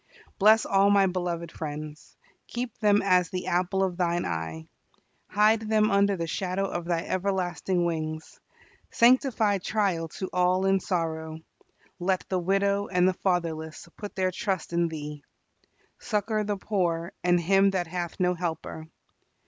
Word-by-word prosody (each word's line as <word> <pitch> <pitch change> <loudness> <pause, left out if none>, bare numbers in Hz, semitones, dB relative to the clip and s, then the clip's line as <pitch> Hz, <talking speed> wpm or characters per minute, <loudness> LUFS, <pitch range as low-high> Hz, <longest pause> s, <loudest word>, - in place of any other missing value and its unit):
Bless 215 +2 +6
all 195 +1 +3
my 200 -1 +5
beloved 175 -3 -3
friends. 150 0 -7 0.3
Keep 240 -1 -5
them 205 -1 +3
as 180 -3 +3
the 180 -1 -4
apple 185 +2 +1
of 180 -2 -2
Thine 175 -1 0
eye. 80 -1 -4 0.6
Hide 215 +2 +4
them 215 -1 +2
under 200 0 +3
the 170 - -2
shadow 185 +3 -2
of 175 -3 -4
Thy 170 -1 0
everlasting 185 -1 -1
wings. 155 -1 -4 0.5
Sanctify 235 -4 +3
trial 185 -4 0
to 190 - -3
all 180 +1 +2
in 195 0 +3
sorrow. 160 -4 -3 0.6
Let 185 +1 0
the 185 - 0
widow 200 +2 +1
and 180 -1 +2
the 185 - +2
fatherless 165 -4 -2
put 205 - -8
their 185 -1 +1
trust 190 -2 -3
in 170 0 +2
Thee. 150 -2 -7 0.8
Succor 215 -1 -1
the 205 -1 -2
poor 175 -4 -1
and 175 0 +3
him 195 +3 +4
that 185 -2 -1
hath 175 0 -5
no 180 -1 +2
helper. 160 -2 -5
180 Hz, 150 wpm, -27 LUFS, 170-200 Hz, 0.8 s, Bless